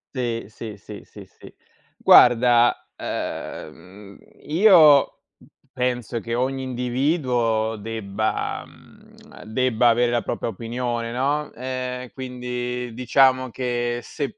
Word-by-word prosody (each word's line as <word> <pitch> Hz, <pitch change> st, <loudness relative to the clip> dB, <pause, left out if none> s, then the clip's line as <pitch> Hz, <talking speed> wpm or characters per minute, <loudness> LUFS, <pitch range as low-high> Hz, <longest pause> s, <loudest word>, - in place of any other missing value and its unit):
Sì, 120 Hz, -4 st, -2 dB
sì, 110 Hz, 0 st, -9 dB
sì, 105 Hz, +1 st, -11 dB
sì, -, -, -13 dB
sì. -, -, -16 dB, 0.5 s
Guarda, 120 Hz, 0 st, +5 dB
ehm, 100 Hz, +2 st, -7 dB, 0.2 s
io, 160 Hz, -5 st, +5 dB, 0.5 s
penso 125 Hz, -2 st, -2 dB
che 115 Hz, +1 st, -4 dB
ogni 130 Hz, +2 st, -1 dB
individuo 125 Hz, -3 st, -1 dB
debba 110 Hz, -1 st, -3 dB
mhmm, -, -, -18 dB
debba 120 Hz, +1 st, +1 dB
avere 120 Hz, +1 st, +2 dB
la 120 Hz, -1 st, +1 dB
propria -, -, -3 dB
opinione, 115 Hz, +2 st, -4 dB
no, 140 Hz, +5 st, -1 dB
ehm, 125 Hz, 0 st, -5 dB
quindi 125 Hz, -1 st, -5 dB
diciamo 130 Hz, +1 st, +2 dB
che 120 Hz, -1 st, -2 dB
se, 155 Hz, -, -5 dB
125 Hz, 105 wpm, -22 LUFS, 115-130 Hz, 0.5 s, Guarda